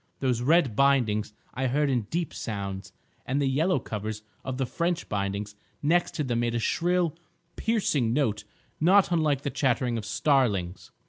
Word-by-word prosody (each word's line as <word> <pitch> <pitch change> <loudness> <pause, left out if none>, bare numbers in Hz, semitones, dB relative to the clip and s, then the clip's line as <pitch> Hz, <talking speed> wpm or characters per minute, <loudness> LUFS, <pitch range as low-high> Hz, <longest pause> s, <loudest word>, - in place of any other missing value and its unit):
Those 125 -3 0
red 145 -3 +3
bindings 120 -6 +2 0.2
I 130 +2 -1
heard 145 +4 +1
in 125 -6 0
deep 170 0 -2
sounds, 100 -3 -5 0.3
and 135 +3 -1
the 140 - +1
yellow 155 +7 +2
covers 110 -2 -5 0.2
of 130 -1 -4
the 135 - 0
French 170 +5 -2
bindings 100 0 -3 0.3
next 170 +4 +2
to 155 - -1
them 120 -3 -1
made 120 0 0
a - - +1
shrill, 175 +5 +1 0.4
piercing 175 - +1
note 115 -6 0 0.4
not 185 +3 +5
unlike 155 -5 +2
the 140 - -2
chattering 125 -3 0
of 105 - -7
starlings. 110 - +1
130 Hz, 160 wpm, -27 LUFS, 110-155 Hz, 0.4 s, not